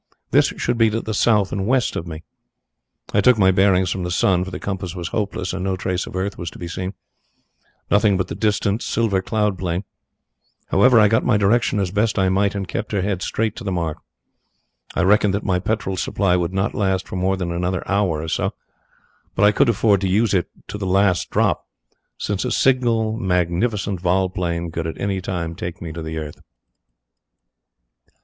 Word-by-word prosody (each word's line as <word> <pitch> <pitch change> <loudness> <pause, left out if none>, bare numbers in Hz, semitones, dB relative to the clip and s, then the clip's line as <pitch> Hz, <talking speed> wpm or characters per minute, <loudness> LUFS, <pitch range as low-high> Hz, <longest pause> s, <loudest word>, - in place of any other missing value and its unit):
This - - +5
should 120 -1 -1
be 115 -1 +5
to 110 +1 -1
the 110 - -4
south 105 -2 +2
and 100 -1 -2
west 130 -1 +1
of 85 - -4
me. 80 0 -7 0.9
I 100 - +4
took 125 +3 +5
my 95 -2 +5
bearings 95 -1 +3
from 95 - -2
the 90 - -3
sun, 90 +1 +2
for 95 - -6
the - - -6
compass 95 -3 -4
was 85 -2 -4
hopeless 100 -4 -2
and 95 -1 -3
no 95 0 0
trace 90 0 -2
of - - -9
earth 95 +2 -3
was 85 - -4
to - - -13
be 85 - -6
seen 90 +3 -5 1.0
nothing 100 -1 +4
but 95 - -1
the - - -5
distant, 105 0 0
silver 105 -5 0
cloud 105 -1 -1
plain. 90 0 -2 0.9
However, 120 +4 +5
I 105 - +6
got 110 +2 +2
my 115 -4 +3
direction 105 +1 +2
as 95 -3 -1
best 105 +2 0
I 95 -1 +3
might 100 +2 +1
and 100 -2 -3
kept 105 - -4
her 100 -3 +1
head 95 -2 -1
straight 110 +2 -1
to 120 - -7
the 100 - -2
mark. 85 -4 -2 1.0
I - - +2
reckoned 100 +1 +3
that 100 - -3
my 90 -2 +1
petrol 95 -1 -2
supply 95 -1 +1
would 90 -1 0
not 95 +3 -1
last 95 -2 0
for - - -7
more 95 +1 0
than 90 -2 -3
another 90 +1 -2
hour 95 -6 0
or - - -5
so, - - -1 0.8
but - - +1
I 105 - +6
could 130 +4 +3
afford 105 -3 +3
to 95 - 0
use 105 +2 +2
it 90 -3 +1 0.2
to 105 - -5
the 95 - -3
last 95 -1 +2
drop, - - +1 0.5
since 100 -2 -2
a 125 - -1
single 115 -4 +2
magnificent 95 0 0
vol 95 +1 +1
plane 85 -2 -2
could 80 0 -3
at 80 - -6
any 95 -1 -1
time 85 -3 -3
take 85 0 -6
me 85 -2 -6
to 85 +1 -6
the 80 0 -5
earth. 75 -2 -7
95 Hz, 205 wpm, -21 LUFS, 90-105 Hz, 1.0 s, I